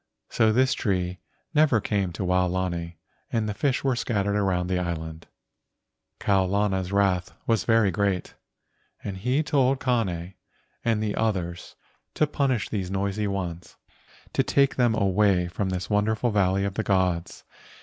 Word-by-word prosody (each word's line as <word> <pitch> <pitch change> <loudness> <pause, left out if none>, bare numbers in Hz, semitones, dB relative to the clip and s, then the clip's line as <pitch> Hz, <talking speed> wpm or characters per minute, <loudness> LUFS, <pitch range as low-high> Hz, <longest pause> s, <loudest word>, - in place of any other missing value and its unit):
So 110 -1 +3
this 130 +3 +3
tree 90 -3 -1 0.3
never 150 -6 +4
came 100 -3 -1
to 90 - -4
Waolani 90 -2 0 0.4
and 110 -2 0
the 105 - -2
fish 135 +4 0
were 135 -2 +2
scattered 100 -4 -1
around 95 -3 +1
the 90 0 0
island. 80 -2 -5 0.9
Kau 95 -2 +2
lana's 95 -1 0
wrath 100 -2 +1
was 115 -2 +1
very 115 -4 +4
great, 100 -1 -1 0.7
and 100 - -4
he 125 +10 +1
told 135 -3 +2
Kane 95 -9 -1 0.5
and 110 -2 +1
the 105 -1 -1
others 90 -6 -2 0.4
to 155 - +3
punish 135 -6 0
these 95 -4 -3
noisy 100 +2 -1
ones, 90 -4 -5 0.6
to - - +3
take 140 -1 +2
them 120 -3 +2
away 100 -3 +2
from 95 +2 -2
this 90 -1 -3
wonderful 110 +3 +1
valley 100 -1 +2
of 100 - -2
the 110 - -2
gods. 90 -3 0
100 Hz, 150 wpm, -25 LUFS, 90-110 Hz, 0.9 s, never